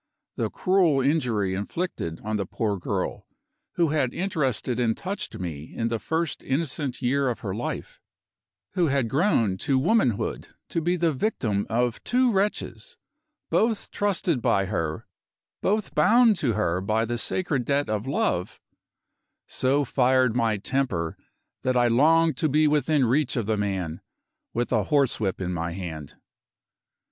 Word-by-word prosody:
The - - -1
cruel 185 -7 +2
injury 125 -9 +1
inflicted 100 - -4
on 110 0 -2
the 100 -2 -3
poor 105 -1 -1
girl, - - -3 0.5
who 170 -2 +2
had 145 -5 0
interested 135 - -1
and 115 -2 +1
touched 190 +1 -4
me 80 -4 -6
in 115 0 0
the 115 -1 -1
first 160 +3 -2
innocent 140 -2 -2
year 135 +2 +2
of 120 - -4
her 100 -3 -3
life 115 +5 -5 0.7
who 180 -3 +1
had 135 -4 +1
grown 115 - +2
to 135 +6 +1
womanhood 145 - +1 0.2
to 165 - -1
be 175 +3 +1
the 170 -2 +1
victim 115 - -1
of 120 0 0
two 250 0 +2
wretches, 210 - -2 0.5
both 225 -1 +1
trusted 185 -8 0
by 100 -3 +2
her, 80 -5 -3 0.6
both 210 +1 0
bound 230 -1 +5
to 130 -8 +1
her 90 -4 0
by 110 +3 +1
the 120 +1 -3
sacred 145 -6 0
debt 140 +2 +1
of 110 +2 -2
love 90 -9 -1 0.9
so 140 +2 +1
fired 130 -2 +3
my 115 -3 +2
temper 100 -8 -1 0.5
that 130 0 +1
I 120 0 +4
longed 160 +6 +4
to 155 - +1
be 155 +2 +4
within 150 -1 +2
reach 135 +3 +1
of 115 - 0
the 110 +1 +1
man, 95 -6 -2 0.5
with 120 +1 -2
a 110 -5 +2
horsewhip 125 -9 +1
in 90 -1 -2
my 85 0 -3
hand. 80 -6 -7
130 Hz, 150 wpm, -25 LUFS, 105-160 Hz, 0.9 s, bound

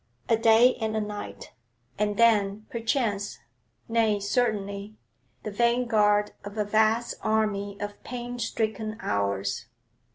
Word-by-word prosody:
A 230 - +5
day 225 +3 +5
and 220 0 -1
a - - +2
night, 210 -1 -6 0.5
and 210 -1 0
then, 215 -3 +3
perchance 225 -4 -1 0.5
nay, 225 -2 +2
certainly 205 -2 -1 0.5
the 215 - -4
vanguard 215 -2 +2
of 205 +1 -8
a 210 - +1
vast 220 +3 +2
army 205 -2 0
of 205 0 -6
pain 245 0 -6
stricken 220 -1 -2
hours. 100 - -1
215 Hz, 120 wpm, -27 LUFS, 205-230 Hz, 0.5 s, A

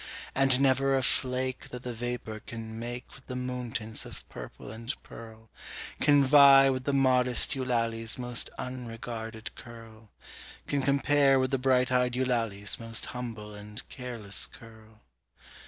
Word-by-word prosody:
And 135 -1 +3
never 135 0 +3
a 130 - 0
flake 130 0 0
That 125 0 -8
the 125 - -4
vapour 120 -2 -4
can 110 0 -7
make 120 +1 -5
With 135 - -16
the 125 - -5
moon 125 -1 -4
tints 110 -2 -3
of - - -9
purple - - -9
and 115 +3 -5
pearl, 110 -1 -12 0.5
Can 145 -1 +5
vie 135 -1 +8
with 130 -1 -3
the 140 - +1
modest 130 -2 +4
Eulalie's 115 -4 -1
most 125 -1 -1
unregarded 115 -2 -6
curl 115 -2 -13 0.6
Can 140 -1 0
compare 140 0 +4
with 130 0 +1
the 135 - +1
bright 130 -1 +3
eyed 125 -1 +2
Eulalie's 115 -6 -1
most 115 -1 -2
humble 115 -4 -6
and 105 +1 -9
careless 115 -6 -2
curl. 110 -2 -16
125 Hz, 145 wpm, -29 LUFS, 115-130 Hz, 0.6 s, vie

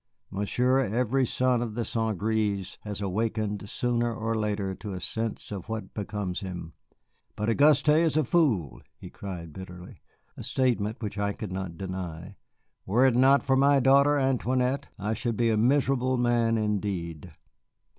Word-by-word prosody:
Monsieur, 125 +7 +1
every 125 +2 +1
son 125 0 +1
of 115 -3 -4
the 120 -1 -2
St. 110 -3 -1
Grés 100 -2 -1
has 105 -1 -6
awakened 105 0 -2
sooner 120 -1 0
or 115 0 -2
later 105 -3 -1
to 100 +1 -7
a 90 - -4
sense 110 +5 -4
of 100 -1 -6
what 110 -1 -5
becomes 100 -3 -3
him. 90 -4 -7 0.6
But 105 +2 -1
Auguste 145 +3 +4
is 155 0 +4
a 155 - +4
fool," 125 - +1 0.2
he - - -11
cried 85 -5 -7
bitterly, 90 0 -10 0.3
a - - -8
statement 115 -4 0
which 105 -1 -4
I 100 0 0
could 105 -2 -7
not 95 -3 -5
deny; 90 -1 -6 0.5
"were 120 +7 +3
it 130 -3 +4
not 135 +3 +5
for 135 - +2
my 140 +1 +5
daughter, 140 +3 +5
Antoinette, 130 0 0
I 105 +2 -2
should 115 0 -2
be 115 -1 +2
a - - +2
miserable 130 +1 +2
man 120 -2 +2
indeed." 95 -6 -2
110 Hz, 160 wpm, -27 LUFS, 100-125 Hz, 0.6 s, not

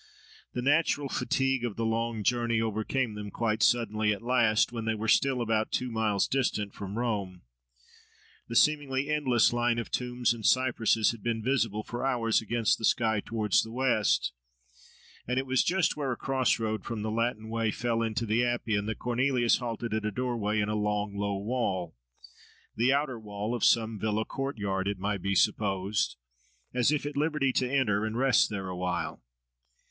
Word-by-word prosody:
The 125 - -3
natural 145 0 +2
fatigue 135 -1 0
of 115 -4 -2
the 115 - -2
long 115 -1 -1
journey 120 0 +1
overcame 110 +2 -1
them 105 -1 -6
quite 110 +1 -1
suddenly 110 -3 +2
at 105 +2 -3
last, 120 -3 +3
when 115 -2 -5
they 110 0 0
were 110 +1 -4
still 130 +2 +3
about 110 -1 0
two 125 -1 -1
miles 110 -3 +1
distant 110 -6 -1
from 100 +1 -6
Rome. 100 -7 -2 1.0
The 115 - -6
seemingly 145 -1 +2
endless 130 -7 +3
line 120 0 +1
of 115 - -4
tombs 125 -1 0
and 115 -2 -9
cypresses 115 -4 +3
had 115 -2 -10
been 115 -1 -2
visible 115 -5 0
for 120 +3 -5
hours 120 -5 +1
against 115 0 +1
the - - -10
sky 110 -1 +2
towards 105 -3 +1
the 115 - -7
west; 120 - +1 0.9
and 125 +1 -1
it 130 - 0
was 130 -1 +2
just 180 -2 +1
where 140 -3 -2
a 120 - -3
cross 130 -2 +1
road 110 -2 -2
from 115 -3 -4
the 110 - -2
Latin 115 -1 -1
Way 115 0 -1
fell 115 +2 -1
into 115 +1 -1
the 110 +2 +1
Appian, 110 -4 -1
that 110 - -3
Cornelius 125 0 +2
halted 115 -2 -4
at 110 0 -1
a 110 - 0
doorway 110 -2 -1
in 105 - +1
a 105 - -1
long, 105 -1 -1
low 100 0 -1
wall—the 95 - -4
outer 140 -4 0
wall 105 +1 -4
of 120 - -3
some 110 -2 +3
villa 110 +1 -1
courtyard, 105 -8 -3
it 100 -1 -1
might 100 0 -2
be 100 +1 -1
supposed— 100 0 +1 0.6
as 125 +2 +3
if 150 -1 -1
at 145 - -4
liberty 150 -3 +1
to 125 0 0
enter, 110 -7 +1
and 110 +1 -2
rest 130 -2 +4
there 100 -3 -4
awhile. 90 -6 -3
115 Hz, 180 wpm, -29 LUFS, 105-125 Hz, 1.0 s, rest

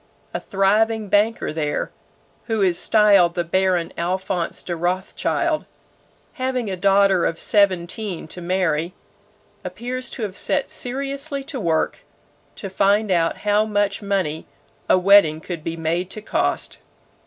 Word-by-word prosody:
A - - -2
thriving 210 +2 +1
banker 210 -2 +1
there, 150 -2 -2 0.5
who 220 -3 0
is 180 -2 +2
styled 200 -5 +4
the 175 - 0
Baron 180 0 0
Alphonse 180 0 -2
de 175 - -3
Rothschild, 185 - -1 0.7
having 255 -6 -2
a - - -2
daughter 195 -1 +3
of 165 - 0
seventeen 190 -1 0
to 180 - -8
marry, 175 -2 0 0.7
appears 240 +8 -4
to 235 - -6
have 200 -3 -4
set 280 +6 0
seriously 275 +2 -4
to 275 -2 -6
work 165 - 0 0.6
to 200 - -6
find 200 +2 +2
out 165 -2 +1
how 210 +1 +3
much 205 -1 0
money 190 -6 -2 0.4
a - - +6
wedding 185 -4 +5
could 165 -1 -7
be 165 0 -4
made 170 +3 -1
to 215 - -6
cost. - - -1
195 Hz, 135 wpm, -22 LUFS, 175-215 Hz, 0.7 s, a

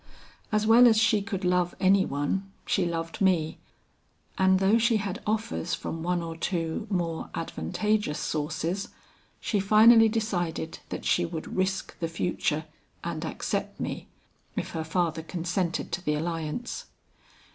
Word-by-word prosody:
As 215 0 +2
well 235 +3 +8
as 225 -2 +5
she 215 -1 +4
could 195 -2 -4
love 180 -1 +2
any 190 0 +4
one, 165 +8 -2
she 180 -3 +1
loved 165 +1 -4
me, 175 -5 +2 0.8
and 190 0 +4
though 195 +4 +4
she 230 0 +3
had 200 -3 -4
offers 215 -6 -1
from 165 -1 -5
one 175 0 0
or 165 -1 -5
two 165 +4 -2
more 170 -4 -2
advantageous 210 - -1
sources, 160 +5 -2 0.5
she 210 - 0
finally 220 +3 +7
decided 175 -7 -2
that - - -5
she 175 - +3
would 165 -2 -5
risk 190 0 -1
the 165 - -1
future 165 -2 -1 0.4
and - - -3
accept - - -3
me, - - -4 0.5
if - - -3
her 160 - -3
father 160 0 0
consented 170 +1 -2
to 175 - -3
the 150 -3 +1
alliance. 165 +8 -3
180 Hz, 145 wpm, -27 LUFS, 165-210 Hz, 0.8 s, well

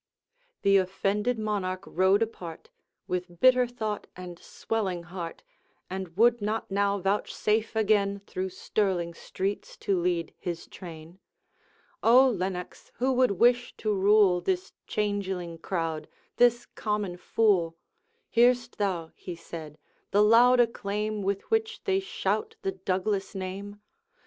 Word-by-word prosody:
The 195 -1 +6
offended 200 +5 0
Monarch 195 -4 -2
rode 190 +4 +3
apart, 175 -7 -8 0.4
With 180 -1 -4
bitter 255 +2 +5
thought 220 -4 -4
and 180 -1 -9
swelling 190 -6 -3
heart, 175 - -7 0.5
And 190 -2 -5
would 235 +1 +4
not 210 0 -2
now 200 0 +2
vouchsafe 210 +3 0
again 205 -2 +2
Through 190 -1 -3
Stirling 185 -2 -1
streets 195 +4 -4
to 195 -2 0
lead 170 -2 -1
his 175 -3 -4
train. 165 0 -11 0.8
'O 255 +4 +7
Lennox, 185 -3 -4
who 260 +2 +1
would 255 -4 +3
wish 245 +5 +2
to 215 -1 0
rule 200 -2 +4
This 370 - -2
changeling 190 -5 -2
crowd, 165 -3 -3 0.3
this 240 0 +4
common 210 -4 -3
fool? 180 -4 +1 0.5
Hear'st 240 0 +3
thou,' 180 -5 -1
he 180 - -8
said, 160 -2 -9 0.3
'the 205 +1 +4
loud 240 +3 +6
acclaim 215 -2 0
With 195 0 -1
which 445 +1 0
they 385 -1 +2
shout 445 +2 -2
the 385 - 0
Douglas 195 - -2
name? 195 +2 -6
200 Hz, 125 wpm, -28 LUFS, 180-225 Hz, 0.8 s, O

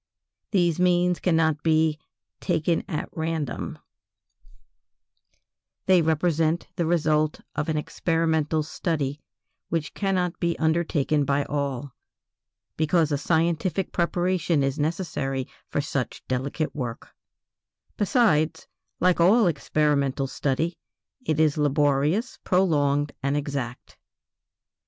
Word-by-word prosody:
These 175 -4 +2
means 180 0 +3
cannot 160 -4 +2
be 160 -1 +2 0.4
"taken 165 +1 0
at 155 - -3
random"; 160 -5 -3 2.1
they 185 -2 +5
represent 160 +1 +1
the 170 -3 0
result 155 -2 +1
of 150 +2 -2
an 155 - 0
experimental 160 -1 0
study 150 -3 -2 0.5
which 165 -2 -2
cannot 185 -3 -1
be 170 0 0
undertaken 160 -2 +1
by 140 +1 +1
all, 140 -2 -3 0.8
because 160 0 +2
a 145 - +2
scientific 170 +4 0
preparation 175 -3 +1
is 135 +2 -1
necessary 145 -5 -2 0.2
for - - 0
such 140 -4 -3
delicate 135 +5 -2
work; 120 -5 -5 0.9
besides, 170 - +2 0.3
like 180 -1 +3
all 210 +6 +5
experimental 145 -4 +1
study, 145 +5 -1 0.4
it 155 -9 0
is 155 -1 +3
laborious, 150 - +1
prolonged, 145 -6 +2
and 140 +2 0
exact. 140 -4 -5
155 Hz, 100 wpm, -25 LUFS, 145-170 Hz, 2.1 s, they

